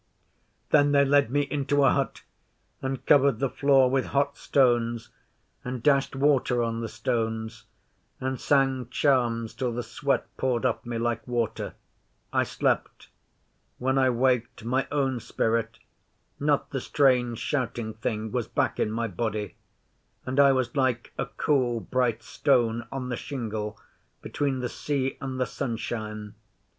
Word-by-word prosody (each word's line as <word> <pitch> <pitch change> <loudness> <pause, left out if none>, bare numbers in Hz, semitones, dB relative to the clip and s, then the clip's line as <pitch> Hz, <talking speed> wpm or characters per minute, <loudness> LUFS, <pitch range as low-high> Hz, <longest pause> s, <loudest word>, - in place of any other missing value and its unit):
Then 145 -1 +5
they 140 0 +5
led 140 -3 +4
me 145 +3 +2
into 145 0 0
a - - +6
hut - - -1 0.6
and 135 -1 -4
covered 140 -4 +5
the 135 -1 -1
floor 135 -1 +4
with 130 0 +1
hot 140 0 0
stones 120 -3 +1 0.5
and 125 -2 -5
dashed 140 -2 +3
water 135 -3 +2
on 115 0 -2
the 115 - -4
stones, 110 -1 -2 0.5
and 130 -1 -3
sang 135 -3 +2
charms 120 -5 +1
till 130 -2 -2
the 120 +1 -3
sweat 140 +3 -1
poured 130 -1 0
off 120 -1 -1
me 120 -1 -3
like 115 -1 -2
water. 115 -2 -2 0.6
I - - +3
slept. - - -1 0.7
When 130 +2 +1
I 130 -1 +4
waked, 125 -2 0
my 130 +3 0
own 135 -3 0
spirit 115 0 -1 0.6
not 145 0 +1
the 135 - -2
strange, 125 -5 +2
shouting 120 -5 -2
thing 110 0 -3
was 120 -4 -1
back - - -1
in - - +1
my 115 +1 -1
body, 105 0 -3 0.7
and 130 +2 -1
I 140 -1 +7
was 130 -2 0
like 130 -3 0
a - - -1
cool 125 -6 +1
bright 125 -1 -1
stone 120 -4 +1
on 130 -2 -4
the 125 - -2
shingle 110 -6 -4 0.4
between 130 +4 -1
the 125 - -1
sea 135 -1 -2
and 130 -1 -4
the 130 - +2
sunshine. 110 -3 -4
125 Hz, 150 wpm, -27 LUFS, 115-135 Hz, 0.7 s, I